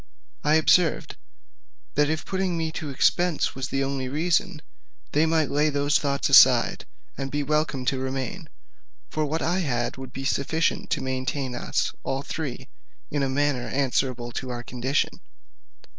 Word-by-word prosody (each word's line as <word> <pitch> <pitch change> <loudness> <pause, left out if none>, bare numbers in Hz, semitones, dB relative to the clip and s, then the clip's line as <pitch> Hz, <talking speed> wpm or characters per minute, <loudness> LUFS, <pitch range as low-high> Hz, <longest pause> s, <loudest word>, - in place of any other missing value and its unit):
I 150 +1 +4
observed, 160 +1 +3 0.8
that 150 0 +2
if 160 0 -2
putting 190 -2 -1
me 160 -1 -1
to 155 -2 -5
expense 170 +5 +1
was 130 -1 -4
the 135 +1 -1
only 135 -1 -2
reason, 170 +3 0 0.5
they 155 +2 +3
might 160 -3 +1
lay 150 +2 +2
those 145 0 +2
thoughts 140 -1 0
aside, - - +6 0.3
and 135 0 -3
be 145 +1 -1
welcome 150 -3 0
to 135 0 0
remain: 135 +6 -4 0.6
for 155 -1 -1
what 160 +3 -2
I 175 +3 +1
had 125 -9 -1
would 130 -1 -8
be 135 +2 -6
sufficient 160 +4 0
to - - -1
maintain 130 0 -2
us 120 - -1
all 135 +1 -2
three, 135 -5 -5 0.4
in 145 - 0
a 135 - +1
manner 140 -2 0
answerable 130 -3 -1
to 130 +2 -5
our 120 -1 -5
condition. 130 +4 -1
140 Hz, 160 wpm, -25 LUFS, 130-155 Hz, 0.8 s, aside